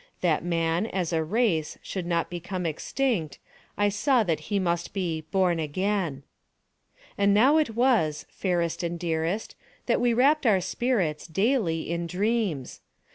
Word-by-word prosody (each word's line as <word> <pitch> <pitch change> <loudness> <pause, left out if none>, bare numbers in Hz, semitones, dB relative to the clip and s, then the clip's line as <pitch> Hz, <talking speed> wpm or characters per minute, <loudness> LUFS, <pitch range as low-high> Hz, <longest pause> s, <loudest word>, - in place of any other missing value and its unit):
That 165 -4 +1
man, 170 +3 0
as 180 -5 -2
a 160 -1 +1
race, 170 -4 0
should 185 -3 -4
not 170 -1 0
become 175 +1 -4
extinct, 170 - -1 0.4
I 205 0 +3
saw 240 +4 +2
that 165 -6 0
he 205 - +1
must 170 -2 -1
be 175 -5 -2
"born 185 -3 +2
again." 165 -2 -1 1.0
And 200 0 +4
now 265 +9 +5
it 295 -8 0
was, 225 - +2
fairest 175 -3 -1
and 170 0 -3
dearest, 170 +4 -2 0.3
that - - +1
we 240 -1 +2
wrapped 280 +3 +3
our 200 -4 +5
spirits, 185 -7 -1
daily, 195 - 0
in 170 0 -2
dreams. 195 - -1
180 Hz, 145 wpm, -26 LUFS, 165-220 Hz, 1.0 s, now